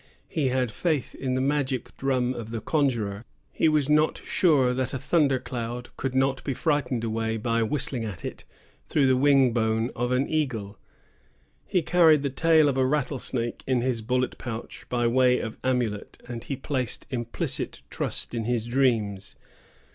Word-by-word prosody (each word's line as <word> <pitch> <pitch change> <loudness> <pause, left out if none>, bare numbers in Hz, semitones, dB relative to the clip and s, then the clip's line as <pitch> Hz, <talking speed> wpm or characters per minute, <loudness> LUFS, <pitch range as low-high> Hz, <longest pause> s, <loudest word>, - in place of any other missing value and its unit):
He 150 -4 0
had 125 -2 0
faith 150 - -1
in 130 -1 -2
the 130 - +1
magic 135 -2 -1
drum 130 -2 0
of 115 -3 -7
the 115 0 -3
conjuror; 115 -7 0 0.3
he 160 - +2
was 150 -3 +2
not 150 +1 +3
sure 140 -8 +3
that 130 +1 -2
a - - 0
thunder 140 0 +2
cloud 120 -1 -5
could 130 -1 -3
not 135 0 +1
be 135 - -2
frightened 130 -7 0
away 115 0 -1
by 115 +1 0
whistling 125 +1 0
at 100 -7 -6
it - - -6 0.5
through 145 -3 +3
the 130 -1 +4
wing 135 -2 +4
bone 115 0 +1
of 120 +1 -1
an 130 +2 +2
eagle; 120 -10 -2 0.9
he 180 -3 +1
carried 160 -4 +5
the 140 - -1
tail 160 +2 +4
of 135 -2 0
a 130 - +3
rattlesnake 130 -4 -2
in 130 -2 +2
his 125 -2 -1
bullet 125 +2 -1
pouch 115 0 -7
by 120 -1 0
way 125 +1 +4
of 110 - -5
amulet; 120 -5 -1
and 120 -1 -6
he 140 - -3
placed 130 -2 -3
implicit 120 -2 -2
trust - - -3
in 115 -2 -2
his 120 -1 0
dreams. 115 -6 0
125 Hz, 170 wpm, -26 LUFS, 115-140 Hz, 0.9 s, carried